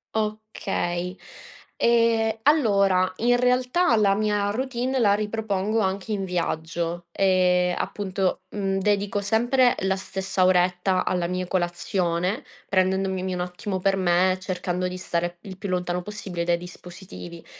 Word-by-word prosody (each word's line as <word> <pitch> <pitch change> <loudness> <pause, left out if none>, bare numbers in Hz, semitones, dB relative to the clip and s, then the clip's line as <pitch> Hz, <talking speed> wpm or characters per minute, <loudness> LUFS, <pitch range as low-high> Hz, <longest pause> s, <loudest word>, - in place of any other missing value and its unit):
Okay. 210 -4 -2 0.6
Ehm, 230 -1 +3
allora 200 -11 +3
in 245 +2 +3
realtà 250 +4 +2
la 200 -2 +4
mia 205 -1 +1
routine 255 +3 -2
la 205 -3 +4
ripropongo 210 0 -1
anche 195 +1 -1
in 195 -2 -1
viaggio. 170 -1 -2
Ehm, 180 -2 +3
appunto, 195 -2 -2
mhmm, 195 -2 -1
dedico 205 0 0
sempre 240 +4 +3
la 190 0 +1
stessa 190 -1 -2
oretta 185 0 +2
alla 180 -2 0
mia 180 +1 -2
colazione, 180 - -1 0.2
prendendomi 190 0 0
un 180 - -2
attimo 180 +2 -4
per 195 +1 +2
me, 185 0 +3
e 185 - -2
cercando 185 -1 -2
di 180 - -5
stare 175 -1 -2
il 190 -2 -9
più 200 0 -5
lontano 180 -1 -1
possibile 190 -3 -5
dai 175 0 +2
dispositivi. 175 -1 -10
190 Hz, 135 wpm, -24 LUFS, 180-210 Hz, 0.6 s, la